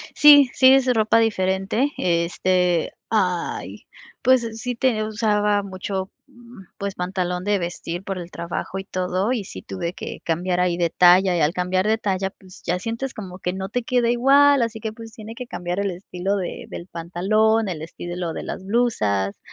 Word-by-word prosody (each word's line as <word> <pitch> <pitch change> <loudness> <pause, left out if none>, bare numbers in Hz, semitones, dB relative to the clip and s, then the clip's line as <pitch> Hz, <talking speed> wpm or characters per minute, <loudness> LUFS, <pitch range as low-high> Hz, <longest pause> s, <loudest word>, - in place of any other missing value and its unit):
Sí, 290 -3 +8
sí, 260 0 +7
es 270 -1 +3
ropa 220 0 +3
diferente. 200 +4 +1
Este, 175 0 +1 0.2
¡ay!, 180 -5 -1 0.4
pues, 255 -2 +4
sí 245 +1 -3
ten 230 -2 +1
usaba 210 -2 +1
mucho, 190 0 -5 0.2
mm, 240 -6 -15
pues, 200 -1 -4
pantalón 180 0 -2
de 205 0 +2
vestir 175 0 -5
por 195 -1 -4
el 175 0 -8
trabajo 170 +3 -5
y 190 - -5
todo, 185 +3 -1
y 230 -6 -2
sí 95 - -9
tuve 100 - -4
que - - -7
cambiar 175 +2 0
ahí 180 -1 +1
de 170 -1 +1
talla, 180 +2 +5
y - - 0
al 150 +1 +3
cambiar 185 +2 0
de 220 +1 +3
talla, 195 -2 -1
pues, 185 -2 -17
ya 175 +1 0
sientes 230 +6 -4
como 185 -5 -8
que 180 -1 -2
no 190 0 -4
te 245 +3 -1
queda 240 -1 +2
igual, 275 +3 +5
así 230 -1 -2
que, 220 0 -4
pues, 225 0 -11
tiene 220 0 -9
que 250 +1 -7
cambiar 180 -4 -4
el 200 -1 0
estilo 185 +2 -3
de 185 -3 -5
del 170 - -8
pantalón, 200 +6 +1
el 165 -4 -4
estilo 175 +1 -5
de - - -5
las 190 - -6
blusas, 105 - 0
190 Hz, 185 wpm, -22 LUFS, 180-225 Hz, 0.4 s, Sí